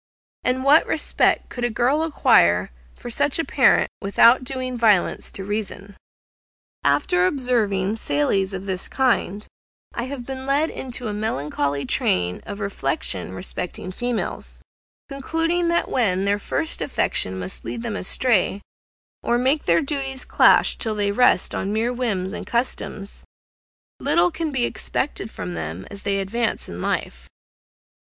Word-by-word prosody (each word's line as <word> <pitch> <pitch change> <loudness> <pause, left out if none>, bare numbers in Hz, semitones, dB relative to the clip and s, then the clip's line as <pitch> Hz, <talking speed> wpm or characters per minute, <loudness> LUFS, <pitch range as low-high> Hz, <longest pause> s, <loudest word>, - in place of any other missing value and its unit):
And 260 +1 0
what 290 +4 +5
respect 310 - +1
could 245 - -6
a 240 - +2
girl 250 +7 +1
acquire 90 - +3 0.2
for 240 - -8
such 285 +3 +1
a 330 - -1
parent, 270 -2 +3
without 230 +5 +5
doing 255 -1 -4
violence 215 -6 +2
to 195 - -6
reason?) 205 -1 -5 0.9
After 145 +6 +2
observing 220 -6 0
sallies 190 +4 0
of 190 0 -6
this 190 -1 -2
kind, 230 -6 0 0.5
I 235 - -2
have 260 -2 -6
been 265 0 -6
led 290 +4 +2
into 245 -2 -3
a 210 - -3
melancholy 145 -9 -2
train 90 -7 0
of 200 0 -6
reflection 135 - -1
respecting 180 - -5
females, 240 +4 -4 0.4
concluding 325 +5 0
that 340 0 +1
when 195 -6 +1
their 200 +1 +2
first 320 +9 -3
affection 95 - 0
must 95 0 -5
lead 230 - -5
them 230 -3 -3
astray, 205 -1 +1 0.6
or 240 - +1
make 265 +5 +1
their 170 0 +3
duties 270 -2 -2
clash - - +5
till 220 -2 -1
they 205 -1 +1
rest 250 -3 +3
on 195 - -2
mere 225 +3 0
whims 205 -6 -2
and - - -6
customs, 235 -4 -3 0.8
little 345 +1 +2
can 320 -1 -3
be 255 -3 +1
expected 250 -5 -3
from 90 - -6
them 80 +2 -5
as 200 - -8
they 200 -1 0
advance 220 +5 -1
in - - -7
life. - - -3
220 Hz, 145 wpm, -22 LUFS, 190-260 Hz, 0.9 s, what